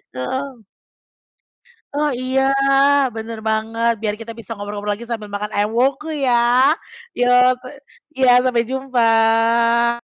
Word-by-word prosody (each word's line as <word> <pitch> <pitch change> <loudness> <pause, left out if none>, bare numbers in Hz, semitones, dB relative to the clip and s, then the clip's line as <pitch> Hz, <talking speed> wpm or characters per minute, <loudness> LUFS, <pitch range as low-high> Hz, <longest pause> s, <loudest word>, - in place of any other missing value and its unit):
Heeh. 260 - -5 1.3
Oh, 295 +1 0
iya. 260 +1 0 0.7
Bener 225 0 -6
banget. 225 +2 0
Biar 210 -1 -2
kita 230 0 -8
bisa 230 - -13
ngobrol-ngobrol 205 0 -4
lagi, 235 - -10
sambil 215 -3 -5
makan 210 +1 -4
ayam 205 +1 0
Woku 275 +5 0 0.2
ya. 250 - +2 0.9
Yo, 245 - +2 0.3
pe 255 - -11 0.5
iya, 260 -1 +4
sampai 245 -2 +1
jumpa. 235 -2 +2
230 Hz, 120 wpm, -19 LUFS, 220-255 Hz, 1.3 s, iya